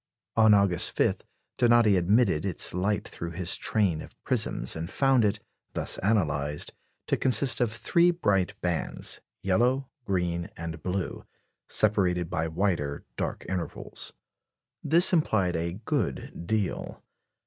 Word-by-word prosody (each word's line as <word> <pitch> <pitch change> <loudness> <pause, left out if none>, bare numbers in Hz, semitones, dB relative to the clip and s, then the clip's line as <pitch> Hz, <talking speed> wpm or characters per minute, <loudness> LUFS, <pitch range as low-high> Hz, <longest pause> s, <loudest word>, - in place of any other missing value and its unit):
On 110 -1 +6
August 100 -4 +3
5 - - +1 0.4
Donati 120 -4 +5
admitted 95 -1 +2
its 95 -4 0
light 95 +2 -1
through 85 0 -7
his 90 +1 +2
train 95 -8 0
of - - -12
prisms, - - 0
and 80 +2 -5
found 135 -1 +3
it, 105 0 +1 0.3
thus - - -1
analysed, 75 -8 0 0.3
to - - +1
consist 130 +1 +3
of 120 -3 +1
three 170 +10 +2
bright 100 - 0
bands 85 -2 -2 0.2
yellow, 125 +8 +1
green, 90 -4 -1
and 80 -1 -6
blue 95 +1 -4 0.4
separated 90 -5 +2
by 80 +1 -1
wider 80 -4 -2
dark - - -4
intervals. 90 -3 -4 0.7
This 175 +4 +5
implied 105 - +2
a 85 +1 -2
good 95 -4 -3
deal. 105 -3 -2
95 Hz, 125 wpm, -27 LUFS, 85-110 Hz, 0.7 s, On